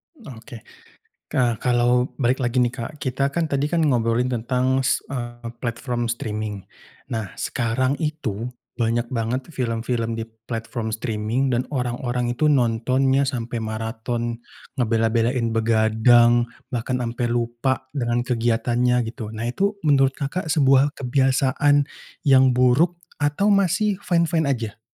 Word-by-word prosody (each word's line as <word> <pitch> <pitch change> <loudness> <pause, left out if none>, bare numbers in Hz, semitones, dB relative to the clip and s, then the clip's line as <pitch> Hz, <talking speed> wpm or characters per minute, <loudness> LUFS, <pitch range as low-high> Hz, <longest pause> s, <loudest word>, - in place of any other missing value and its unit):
Oke 125 - -11 0.7
ka 120 -3 +1
kalau 125 0 +2
balik 130 0 +1
lagi 120 0 -1
nih 120 -1 +3
Kak, 120 +7 -6
kita 135 +2 0
kan 165 +4 -1
tadi 145 -1 0
kan 165 -1 +1
ngobrolin 125 -1 +1
tentang 125 +3 +1
s 130 - 0
eee, 120 -2 -5
platform 120 0 -2
streaming, 110 -3 -4 0.5
nah 110 -3 -2
sekarang 130 +4 -1
itu 125 -8 -3 0.3
banyak 115 +1 +1
banget 120 +2 -1
film-film 115 -2 -2
di 115 - -3 0.2
platform 115 -1 -4
streaming 110 +3 -1
dan 125 +2 -1
orang-orang 125 -2 -2
itu 150 +5 +1
nontonnya 130 +1 +2
sampai 120 -3 -3
maraton 115 +2 -3 0.4
ngebela-belain 115 +1 +1
begadang 115 +2 +4 0.2
bahkan 125 +1 -1
ampe 120 +1 -2
lupa 120 +3 -1
dengan 120 -3 -1
kegiatannya 120 0 +1
gitu 110 -4 -7
nah 110 +1 -5
itu 200 - 0
menurut 135 -2 +3
Kakak, 160 +4 -3
sebuah 140 -2 +3
kebiasaan, 135 +2 +2 0.4
yang 130 -2 +5
buruk 130 +8 +3 0.2
atau 150 +8 +2
masih 200 +1 +2
fine-fine 170 -4 +1
aja? 115 -5 -2
125 Hz, 125 wpm, -23 LUFS, 115-135 Hz, 0.7 s, yang